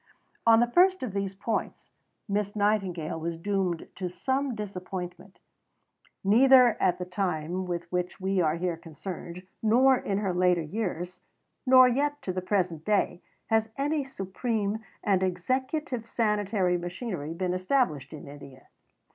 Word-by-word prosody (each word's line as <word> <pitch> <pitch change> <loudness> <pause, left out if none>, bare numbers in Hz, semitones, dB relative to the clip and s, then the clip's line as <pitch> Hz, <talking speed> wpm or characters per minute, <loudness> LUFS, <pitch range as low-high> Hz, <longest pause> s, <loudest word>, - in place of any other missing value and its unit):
On 225 0 +7
the 240 0 +1
first 370 +3 +4
of 230 -7 -4
these 195 -1 -2
points, 215 +3 -3 0.4
Miss 205 0 -1
Nightingale 195 -7 0
was 165 +1 -3
doomed 185 -2 -1
to 180 -1 -3
some 265 +7 -1
disappointment. 185 -2 -6 0.9
Neither 245 +3 +6
at 180 -2 +3
the 180 - -4
time 180 -1 -2
with 175 -1 -2
which 180 +1 -2
we 190 0 +1
are 155 -1 +2
here 175 0 -2
concerned, 170 +2 -8 0.2
nor 250 +5 +5
in 200 -5 -2
her 195 -3 -1
later 180 -1 +3
years, 180 0 -4 0.5
nor 255 0 +8
yet 290 +4 0
to 185 - -2
the 185 - -2
present 180 -4 -1
day, 200 -3 +1 0.3
has 225 0 +3
any 290 +1 0
supreme 220 -2 -2 0.2
and 195 -3 +2
executive 250 - -1
sanitary 205 -5 +1
machinery 175 - -5
been 180 0 -1
established 185 - 0
in 150 -3 -9
India. 140 -2 -12
195 Hz, 140 wpm, -28 LUFS, 180-225 Hz, 0.9 s, nor